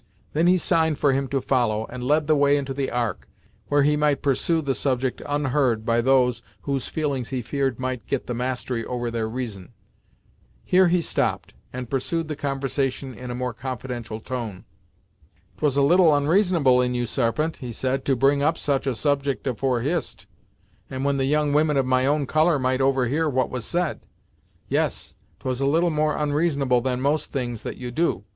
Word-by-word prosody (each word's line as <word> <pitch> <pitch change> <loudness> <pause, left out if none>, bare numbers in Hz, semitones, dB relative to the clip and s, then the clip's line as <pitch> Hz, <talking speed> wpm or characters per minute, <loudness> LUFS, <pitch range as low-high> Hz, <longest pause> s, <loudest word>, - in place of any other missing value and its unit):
Then 160 +3 +2
he 185 +1 +5
signed 160 -3 +1
for 145 -2 +3
him 135 0 0
to 135 +1 0
follow, 115 -5 +1
and 125 +2 -8
led 150 +4 +2
the 155 +1 +3
way 145 0 +4
into 135 -1 -3
the 135 -1 -2
Ark, 120 -2 -2 0.4
where 145 0 +3
he 150 +1 +3
might 150 -1 +1
pursue 145 +4 +1
the 140 -4 -1
subject 130 -1 -1
unheard 135 -6 +1
by 115 0 +2
those 125 -2 +3 0.2
whose 140 -2 -2
feelings 140 -6 -2
he 130 -2 -3
feared 135 0 -1
might 130 -4 -4
get 140 - -2
the 125 - -3
mastery 125 -1 -2
over 120 -1 -3
their 115 -1 -2
reason. 110 -6 -6 0.9
Here 185 0 +4
he 175 0 +2
stopped, - - -1 0.2
and 125 0 -5
pursued 155 +6 -2
the 150 - -2
conversation 135 -2 -2
in 125 0 -8
a 120 - -3
more 125 -1 -3
confidential 120 -2 -5
tone. 115 -5 -5 0.9
"'Twas 145 -3 +1
a 140 - +4
little 175 +3 +5
onreasonable 150 -3 +3
in 125 0 0
you 120 0 0
Sarpent," 135 +7 -1
he 125 -3 -6
said, 130 +3 -1
"to 135 - +2
bring 140 +3 +3
up 145 - +2
such 140 -1 -1
a 130 - 0
subject 140 +1 -1
afore 130 -1 0
Hist, 155 +5 -2 0.6
and 130 +1 -4
when 140 0 +1
the 135 - +1
young 150 +1 +1
women 150 -1 +3
of 135 - +2
my 130 0 +2
own 145 0 +1
colour 155 +3 +3
might 130 0 0
overhear 135 +4 +2
what 130 -3 0
was 125 -3 -4
said. 175 -3 -1 0.7
Yes, - - -1 0.3
'twas 130 0 -3
a 135 - +2
little 165 +4 +2
more 155 0 +1
onreasonable 145 -4 +1
than 125 0 -1
most 145 +3 0
things 120 -5 -3
that - - -6
you 125 -1 -6
do. 125 - 0
135 Hz, 190 wpm, -24 LUFS, 125-150 Hz, 0.9 s, he